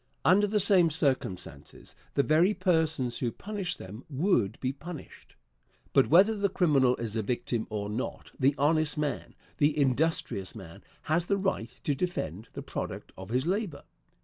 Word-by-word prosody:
Under 205 +3 +5
the 210 +1 +1
same 185 -4 +5
circumstances 115 - -3 0.2
the 140 - +3
very 170 +8 +3
persons 160 -9 +1
who 120 -3 -1
punish 195 - -4
them 105 +6 -10
would 135 - +1
be 130 0 -1
punished. 160 +2 -10 0.6
But 135 - +5
whether 195 +7 +5
the 200 -1 0
criminal 140 -9 +3
is 115 -2 -5
a 110 - +1
victim 115 +1 -2
or 105 -2 -3
not, 110 +5 -5
the 135 +2 +3
honest 155 +2 +2
man, 150 -2 -3 0.2
the 145 0 +3
industrious 135 - 0
man, 95 -6 -11 0.2
has 165 +2 0
the 200 - +2
right 190 - -1
to 145 - +1
defend 115 - -3
the - - -6
product - - -6
of 95 +1 -10
his 125 +4 0
labor. 185 -5 -2
145 Hz, 160 wpm, -29 LUFS, 120-175 Hz, 0.6 s, Under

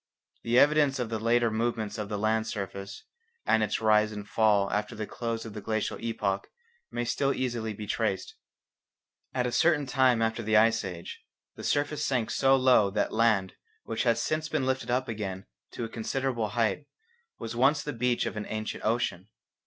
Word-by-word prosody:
The 120 +1 +1
evidence 145 0 +4
of 125 -3 -2
the 110 -1 -2
later 115 +1 +2
movements 110 -1 -2
of 105 -1 -4
the 105 - -2
land 110 +1 +1
surface, 100 -1 -6 0.4
and 110 - +3
its 105 -1 0
rise 110 -1 +3
and 105 -1 -7
fall 105 -2 +2
after 105 0 -2
the 110 - -4
close 115 0 -4
of 110 - -8
the 105 - -6
glacial 110 +1 -2
epoch, 105 -4 -2 0.4
may 120 0 -3
still 140 +3 +1
easily 120 -4 -2
be 105 0 -7
traced. 105 -2 -2 1.0
At 125 -1 +1
a 125 - -1
certain 155 0 +3
time 130 -3 +3
after 115 0 0
the 110 0 +2
Ice 110 0 +4
Age, 90 -3 -7 0.3
the - - -9
surface 145 +1 0
sank 125 -6 0
so 135 0 +4
low 130 -6 +4
that 105 +2 -1
land 110 -4 +2 0.3
which 115 0 -3
has 115 -2 +2
since 155 +5 -1
been 155 -5 0
lifted 130 0 -1
up 125 +1 +1
again 100 -3 -4 0.3
to - - -4
a - - -2
considerable 120 0 -2
height 115 +6 -1 0.5
was 115 +1 -6
once 140 +5 +3
the 150 - -4
beach 120 0 0
of - - -3
the 105 - -4
ancient 110 0 -4
ocean. 110 -4 -1
115 Hz, 185 wpm, -28 LUFS, 105-125 Hz, 1.0 s, evidence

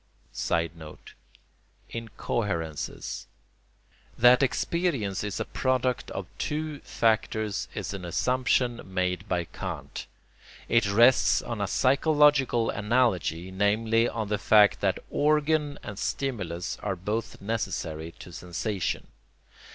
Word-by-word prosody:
[Sidenote: 85 -2 -3 0.8
Incoherences.] 100 -8 -3 0.9
That 125 +2 +7
experience 135 - 0
is 105 -2 -3
a - - -1
product 130 -1 0
of 95 - -5
two 150 -1 -2
factors 110 -2 0
is - - -4
an 95 -2 -6
assumption 125 +6 +1
made 90 +1 -2
by 90 -2 +1
Kant. - - -6 0.6
It 115 -4 +3
rests 120 +5 +5
on 115 -3 -4
a 100 - 0
psychological 140 -1 +3
analogy, 105 -6 +1
namely 110 +4 +2
on 110 -2 -3
the 105 -1 0
fact 105 -1 +5
that 95 -2 +2
organ 150 0 +2
and 105 -1 -7
stimulus 95 -11 -3
are 100 -2 -2
both 105 +6 -3
necessary 85 -7 -3
to 90 - -11
sensation. 90 +3 -3
110 Hz, 105 wpm, -27 LUFS, 95-125 Hz, 0.9 s, That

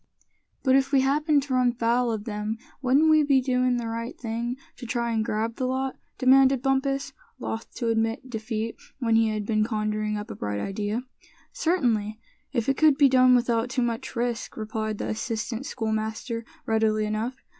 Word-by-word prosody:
"But 260 -1 +4
if 270 0 +2
we 275 -2 +5
happened 290 +2 +2
to 275 -1 -4
run 250 -1 +3
foul 235 +1 +1
of 215 -2 -3
them, 210 0 -3 0.2
wouldn't 280 +5 +4
we 310 0 +6
be 280 -2 +4
doin' 250 -1 +1
the 240 - -3
right 230 +2 -4
thing 235 +1 -3 0.2
to 245 - -8
try 235 0 -1
and 220 -1 +1
grab 225 +1 -2
the 255 - -1
lot?" 265 +1 -1 0.2
demanded 265 0 +5
Bumpus, 275 0 0 0.2
loth 225 - -5
to 235 - -1
admit 225 +3 0
defeat 225 -1 -4 0.2
when 230 -4 +1
he 225 0 +4
had 215 -1 -2
been 215 0 +2
conjuring 215 -1 -1
up 210 +3 -6
a - - -6
bright 105 0 -3
idea. 205 - -2 0.5
"Certainly, 230 - 0 0.3
if 235 -4 -1
it 275 - +2
could 310 -3 +5
be 285 -2 +6
done 255 -1 +6
without 235 -1 +1
too 255 -1 0
much 230 -1 -3
risk," 240 0 -2
replied 215 -1 -3
the - - -3
assistant 225 +3 -3
scoutmaster, 220 +1 -3 0.2
readily 220 -1 +2
enough. 215 +4 -2
235 Hz, 180 wpm, -26 LUFS, 220-260 Hz, 0.5 s, we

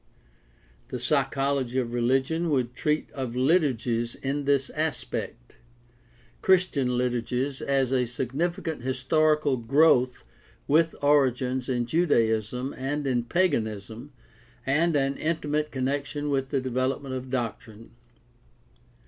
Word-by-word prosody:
The - - -4
psychology 135 0 0
of 120 -2 -1
religion 135 +8 +1
would 125 -5 0
treat 150 +3 -1
of 130 -4 -5
liturgies 125 -5 +1
in 140 +1 -3
this 140 -1 +2
aspect. 140 - -4 0.8
Christian 150 -10 +2
liturgies 125 +2 -1
has 135 -2 0
a 125 -2 +2
significant 155 - -3
historical 140 +3 +2
growth 125 - +3 0.4
with 160 +3 +3
origins 130 -3 +2
in 120 -2 0
Judaism 120 - +1
and 145 +3 -3
in 125 -3 0
paganism 110 - -1 0.5
and 160 +4 +2
an 135 -1 +1
intimate 150 -2 -1
connec 135 +2 -1
tion 145 +1 -4
with 135 -1 0
the 140 - 0
development 130 +1 -2
of 130 0 -5
doctrine. 115 -3 -5
135 Hz, 110 wpm, -26 LUFS, 125-145 Hz, 0.8 s, growth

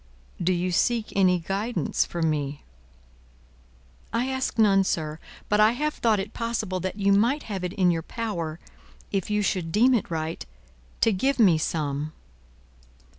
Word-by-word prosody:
"Do 175 +2 +2
you 180 0 0
seek 230 +5 +1
any 185 -2 +4
guidance 205 +5 -1
from 170 -2 -1
me?" 145 -1 -3 1.5
"I 235 +3 0
ask 260 -2 -2
none, 200 -3 +5
sir. 155 -4 -2 0.3
But 210 - +2
I 215 +2 +6
have 300 +4 -1
thought 220 -3 +1
it 200 +3 -5
possible 225 -5 -2
that 185 +1 -3
you 200 -1 +2
might 240 +9 +2
have 195 -4 -5
it 180 0 -3
in 185 -3 +3
your 165 -1 -1
power, 170 -5 -4 0.5
if 195 -1 -1
you 210 0 +1
should 175 -4 -1
deem 245 +8 +4
it 230 - 0
right, 160 -1 -3 0.6
to 225 - +4
give 265 +8 +1
me 185 -9 +5
some." 150 -1 -2
195 Hz, 160 wpm, -25 LUFS, 170-225 Hz, 1.5 s, I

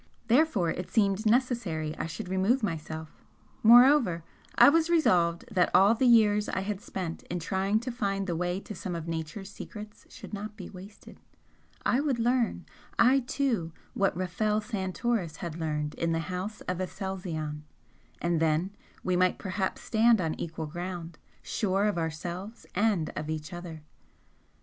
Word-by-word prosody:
Therefore 230 - +3
it 180 - -5
seemed 205 0 +2
necessary 215 -11 +1
I - - -3
should 180 +5 -6
remove 195 +7 +1
myself, 160 -3 -5 0.4
moreover, 240 - +6 0.3
I - - +8
was 325 +3 +4
resolved 175 - +3
that 185 -4 +3
all 200 +3 +7
the 250 +3 +2
years 210 -3 +5
I - - -1
had 200 0 -3
spent 180 -5 -5
in 180 - -2
trying 190 +4 0
to 250 +1 -4
find 195 -4 -1
the 175 -3 -2
way 175 +2 -1
to 210 - -8
some 180 -2 -5
of 165 -1 -5
Nature's 165 +5 -5
secrets 210 0 -10
should - - -11
not 210 +1 -6
be 185 - -8
wasted 195 +2 -12 0.7
I 250 - +3
would 280 -4 0
learn, 240 0 +1 0.3
I 260 +3 +5
too, 240 - -1 0.2
what 200 -7 +1
Rafel 210 +4 0
Santoris 205 -3 -2
had 170 -1 -6
learned 150 -2 -2
in 165 0 -1
the 165 +2 -2
House 200 +4 -4
of 180 -1 -3
Aselzion 180 -6 -4 0.6
and 170 -1 0
then 165 +5 +1 0.3
we 185 - +1
might 185 0 +3
perhaps 190 -1 -3
stand 225 0 +4
on 165 -3 0
equal 160 -1 -4
ground, 175 0 -6 0.2
sure 195 -1 0
of 205 -5 +1
ourselves 175 +7 -5
and 200 -5 +1
of 155 - -4
each 155 +2 -4
other! 170 -3 -8
190 Hz, 160 wpm, -29 LUFS, 170-220 Hz, 0.7 s, I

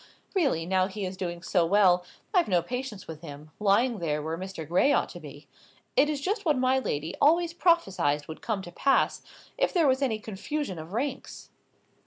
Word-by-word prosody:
Really, 275 - +1
now 185 +1 +2
he 200 0 -5
is 185 +1 -5
doing 175 -2 -5
so 180 -2 +2
well, 180 0 +4 0.3
I've 360 -3 +4
no 180 -4 +2
patience 250 -1 -5
with 160 -1 -8
him, 150 -1 -10
lying 215 +3 +2
there 150 -3 -1
where 160 +2 -3
Mr. 185 -3 -7
Gray 180 - +3
ought - - +2
to 175 - -9
be. 145 -2 -12 0.5
It 295 +2 +4
is 295 -2 -1
just 410 +8 -2
what 305 -5 +2
my 260 +1 +3
lady 155 - -3
always 335 +3 +4
prophesied 190 - +2
would 160 - -8
come 210 -4 -2
to 175 - -9
pass, 275 +9 +2 0.4
if - - +2
there 340 -6 +3
was 260 0 +2
any 245 -6 +1
confusion 215 - -4
of 160 +4 -9
ranks." 270 +4 -4
195 Hz, 195 wpm, -27 LUFS, 170-270 Hz, 0.5 s, well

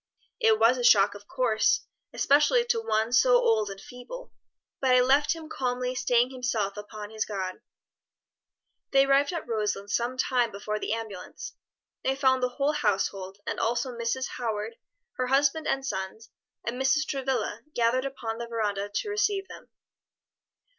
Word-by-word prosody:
"It 220 -1 +4
was 230 +3 +4
a - - -2
shock 200 -4 +6
of 205 0 -13
course, 240 -5 +1 0.3
especially 300 - +3
to 475 -1 +1
one 220 - 0
so 250 0 +5
old 220 -3 +3
and 195 0 -8
feeble; 250 - -10 0.5
but 260 -2 +3
I - - +6
left 275 +5 +3
him 320 -1 -9
calmly 250 -3 -2
staying 245 0 +2
himself 235 -6 -2
upon 210 0 -8
his 220 0 -1
God." 190 -3 -5 1.3
They 270 0 +5
arrived 275 +2 +3
at 335 -6 -5
Roselands 210 -2 -1
some 240 +2 -1
time 245 -3 +1
before 210 +2 -4
the - - -3
ambulance. 225 - -6 0.5
They 265 - +1
found 260 -1 +3
the 250 - +1
whole 280 +4 0
household, 195 -6 -1
and - - -3
also 240 +2 -1
Mrs. 235 +3 -2
Howard, 225 -1 -3 0.4
her 255 - 0
husband 280 +4 +2
and 270 0 0
sons, 190 -1 -5 0.3
and 245 +2 -3
Mrs. 305 +4 +3
Travilla, 270 -3 -2
gathered 240 +2 +2
upon 235 -4 -4
the 235 - -5
veranda 205 -3 -2
to 310 - -3
receive 410 -2 0
them. - - -12
245 Hz, 160 wpm, -27 LUFS, 215-270 Hz, 1.3 s, shock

